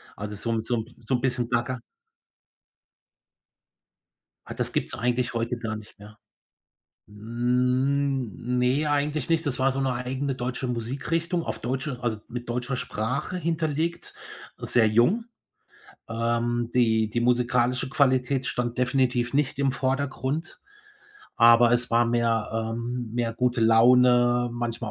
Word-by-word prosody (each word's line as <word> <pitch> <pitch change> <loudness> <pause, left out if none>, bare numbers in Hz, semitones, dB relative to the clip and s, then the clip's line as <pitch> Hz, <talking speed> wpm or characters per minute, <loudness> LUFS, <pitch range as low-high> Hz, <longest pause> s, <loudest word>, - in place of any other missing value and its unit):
also 105 0 -6
so 115 +3 -3
'n 115 - 0
so 120 +2 -1
'n 115 +2 -6
so 115 +3 -1
'n 120 - -2
bisschen 125 -2 0
gaga. 125 +1 -1 2.7
Ah, - - -7
das - - -2
gibt's - - -2
eigentlich 125 +1 -1
heute 115 +1 -2
gar 110 -2 -4
nicht 105 -1 -13
mehr. 105 +1 -14 0.9
Hm, 125 +3 0
ne, 130 +5 +2
eigentlich 145 0 0
nicht, 165 0 +1
das 130 -3 -2
war 130 +1 +2
so 135 - -3
'ne 135 -1 +1
eigene 130 +2 -2
deutsche 125 +1 -3
Musikrichtung, 155 +9 -2
auf - - -4
deutsche 130 +2 -3
also 110 -3 -1
mit 120 0 -7
deutscher 125 +2 -2
Sprache 125 +7 -3
hinterlegt, 165 -1 -2 0.4
sehr 115 -2 +2
jung, 120 - +3 0.8
ähm, 120 +1 -1
die 110 -3 +3
die 120 - -1
musikalische 125 +1 +1
Qualität 130 -1 +2
stand 120 -1 -2
definitiv 125 -1 +1
nicht 145 -1 0
im 135 -1 +1
Vordergrund, 135 +3 -2 0.8
aber 115 0 +7
es 120 0 +1
war 120 0 +3
mehr 115 -2 +1 0.2
ähm, 120 0 -4
mehr 115 -1 -1
gute 125 -1 0
Laune, 120 +1 +5
manchmal 120 -2 -4
125 Hz, 135 wpm, -26 LUFS, 115-130 Hz, 2.7 s, aber